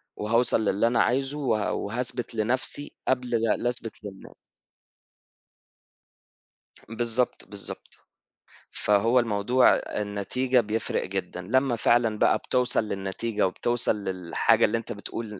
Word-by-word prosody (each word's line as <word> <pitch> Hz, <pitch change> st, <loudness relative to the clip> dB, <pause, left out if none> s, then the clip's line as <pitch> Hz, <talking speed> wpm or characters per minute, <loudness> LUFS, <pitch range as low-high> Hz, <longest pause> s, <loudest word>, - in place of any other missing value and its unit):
وهاوصل 115 Hz, +1 st, +2 dB
للي 100 Hz, +3 st, +2 dB
أنا 115 Hz, 0 st, +2 dB
عايزه 135 Hz, +3 st, 0 dB
وه 110 Hz, -7 st, 0 dB
وهاثبت 120 Hz, +2 st, -3 dB
لنَفْسي، 130 Hz, +6 st, -1 dB, 0.2 s
قبل 125 Hz, -1 st, +1 dB
ل 115 Hz, -2 st, 0 dB
لأثبت 120 Hz, -3 st, -4 dB
للناس. 100 Hz, -2 st, -10 dB, 2.5 s
بالضبط، 120 Hz, +2 st, 0 dB
بالضبط. 100 Hz, -1 st, -8 dB, 0.8 s
فهو 115 Hz, +5 st, +2 dB
الموضوع 120 Hz, +3 st, +3 dB
أ -, -, -4 dB
النتيجة 115 Hz, +5 st, 0 dB
بيفرِق 110 Hz, 0 st, -2 dB
جدًا 95 Hz, -1 st, -5 dB
لمّا 130 Hz, +6 st, +1 dB
فعلًا 115 Hz, -1 st, +2 dB
بقى -, -, +4 dB
بتوصل 125 Hz, -3 st, +1 dB
للنتيجة 100 Hz, +2 st, -2 dB
وبتوصل 120 Hz, +4 st, 0 dB
للحاجة 95 Hz, -3 st, +2 dB
اللي 115 Hz, -, 0 dB
أنت 115 Hz, +1 st, -7 dB
بتقول 105 Hz, -1 st, -6 dB
115 Hz, 115 wpm, -26 LUFS, 105-125 Hz, 2.5 s, بقى